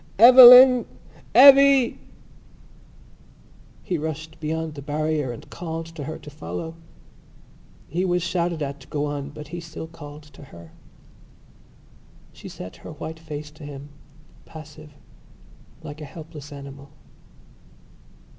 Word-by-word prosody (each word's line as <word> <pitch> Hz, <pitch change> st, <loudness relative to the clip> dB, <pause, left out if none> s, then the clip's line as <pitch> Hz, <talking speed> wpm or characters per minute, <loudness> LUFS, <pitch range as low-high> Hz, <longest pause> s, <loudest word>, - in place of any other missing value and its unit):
"Eveline! 250 Hz, +2 st, +9 dB, 0.5 s
Evvy!" 275 Hz, -1 st, +6 dB, 1.8 s
He 175 Hz, -3 st, -3 dB
rushed 160 Hz, +1 st, -7 dB
beyond 160 Hz, 0 st, -4 dB
the 145 Hz, -, -10 dB
barrier 150 Hz, -1 st, -3 dB
and 120 Hz, -, -11 dB
called 165 Hz, -1 st, -6 dB
to 165 Hz, -3 st, -9 dB
her 155 Hz, -, -6 dB
to -, -, -13 dB
follow. 90 Hz, -, -7 dB, 1.1 s
He 175 Hz, +5 st, -3 dB
was 180 Hz, -2 st, -1 dB
shouted 170 Hz, -2 st, -2 dB
at 140 Hz, 0 st, -6 dB
to -, -, -17 dB
go 145 Hz, 0 st, -3 dB
on 145 Hz, -1 st, -5 dB
but 150 Hz, 0 st, -11 dB
he 175 Hz, +2 st, -7 dB
still 165 Hz, -1 st, -9 dB
called 150 Hz, -2 st, -12 dB
to 150 Hz, -1 st, -16 dB
her. 85 Hz, -9 st, -15 dB, 1.6 s
She -, -, -12 dB
set 90 Hz, -, -10 dB
her -, -, -11 dB
white 160 Hz, +2 st, -8 dB
face 150 Hz, -2 st, -9 dB
to 155 Hz, +1 st, -16 dB
him, 145 Hz, 0 st, -10 dB, 0.6 s
passive, 155 Hz, -1 st, -13 dB, 0.9 s
like 145 Hz, +2 st, -10 dB
a -, -, -7 dB
helpless 150 Hz, -1 st, -12 dB
animal. 140 Hz, 0 st, -11 dB
155 Hz, 125 wpm, -22 LUFS, 145-165 Hz, 1.8 s, Eveline